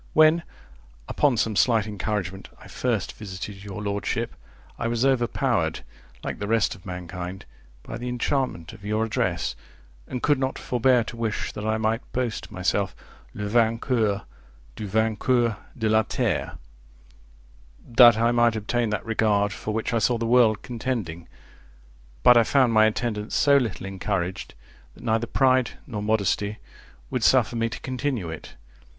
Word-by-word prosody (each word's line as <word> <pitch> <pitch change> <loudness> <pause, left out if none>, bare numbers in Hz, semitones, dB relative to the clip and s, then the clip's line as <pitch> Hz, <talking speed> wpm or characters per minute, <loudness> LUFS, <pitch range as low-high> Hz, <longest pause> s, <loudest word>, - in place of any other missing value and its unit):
When, 155 +2 +6 0.7
upon 140 -5 +2
some 110 -1 0
slight 115 -1 +3
encouragement, 100 -3 -4
I - - -13
first - - -2
visited 95 0 -8
your 105 0 -6
lordship, 100 0 -2 0.5
I 120 - -1
was 120 +2 0
overpowered, 130 -3 +1 0.4
like - - -4
the 100 - -3
rest 115 -1 +2
of 95 - -14
mankind, 90 +1 -6 0.4
by 115 - -7
the 125 +1 -4
enchantment 125 - -2
of 105 -2 -14
your 110 +2 0
address, 95 -6 -1 0.5
and 125 - -5
could 145 -3 +3
not 130 0 -1
forbear 125 0 +2
to 115 - -8
wish 115 -2 -2
that 105 +1 -5
I 110 0 +1
might 110 +2 0
boast 120 -4 -2
myself 95 +1 -1 0.4
Le 105 - -4
vainqueur 115 -1 +1 0.5
du 105 - -5
vainqueur 110 +2 +1 0.2
de 110 -2 0
la 110 0 +4
terre; 110 - -2 1.3
—that 120 -1 +7
I 115 +1 +3
might 120 -1 +3
obtain 115 +2 -1
that 105 - -3
regard 105 -2 +1
for 110 - -5
which 110 +2 -2
I 115 - +3
saw 115 +3 +2
the 115 - -2
world 115 -3 +4
contending; 115 -9 -4 1.0
but 125 - +8
I 115 - +6
found 130 0 +3
my 110 0 +6
attendance 110 -1 -2
so 145 -1 +5
little 115 -7 -2
encouraged, 95 -1 -3 0.4
that - - -14
neither 115 +1 0
pride 130 -1 +2
nor 105 -5 -5
modesty 105 0 0 0.5
would 125 -3 -1
suffer 120 -3 +4
me 115 0 0
to - - -7
continue 130 - -2
it. 80 - -9
110 Hz, 155 wpm, -25 LUFS, 100-120 Hz, 1.3 s, but